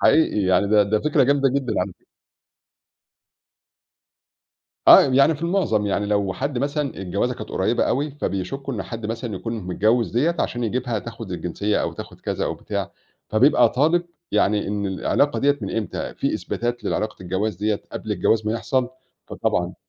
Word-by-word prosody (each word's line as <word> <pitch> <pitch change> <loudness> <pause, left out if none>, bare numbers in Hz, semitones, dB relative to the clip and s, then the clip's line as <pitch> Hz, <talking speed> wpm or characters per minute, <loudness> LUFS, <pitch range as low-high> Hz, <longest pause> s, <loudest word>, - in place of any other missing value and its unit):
حقيقي 160 -9 +4
يعني 95 +1 +3
ده 105 0 +5
ده 105 +1 0
فكرة 150 -1 +2
جامدة 140 +1 +3
جدًا 130 -4 -1
عن 90 +1 -2 3.0
آه - - +11
يعني 140 +4 +4
في 150 - -10
المعظم 170 - +1
يعني 100 +1 0
لو 100 -2 0
حد 135 +4 -3
مثلًا 145 +1 -1
الجوازة 100 +6 -1
كانت 125 - -8
قريبة 110 +6 +1
أوي، 145 +4 0
فبيشكوا 135 - -4
إن 100 - -3
حد 115 0 -6
مثلًا 115 0 -4
يكون 115 +4 -5
متجوز 110 +6 +1
دِيَّة 155 +9 +1
عشان 120 -1 -1
يجيبها 120 0 -1
تاخد 115 -2 -8
الجنسية 95 +4 -1
أو - - -2
تاخد - - -10
كذا - - -2
أو - - -2
بتاع، - - -4 0.4
فبيبقى 125 +8 +5
طالب 160 +6 +2 0.3
يعني 105 0 +2
إن 100 0 -2
العلاقة 100 +9 +1
دِيَّة 145 +1 +2
من 100 0 -4
إمتى، 105 -5 -3
في - - -1
إثباتات 120 -1 -3
لعلاقة 110 -2 -2
الجواز 95 +4 -2
دِيَّة 105 -1 -1
قبل 110 - -4
الجواز 105 +3 +1
ما 110 - +1
يحصل، 125 +2 0 0.4
فطبعًا - - -1
115 Hz, 165 wpm, -22 LUFS, 105-135 Hz, 3.0 s, آه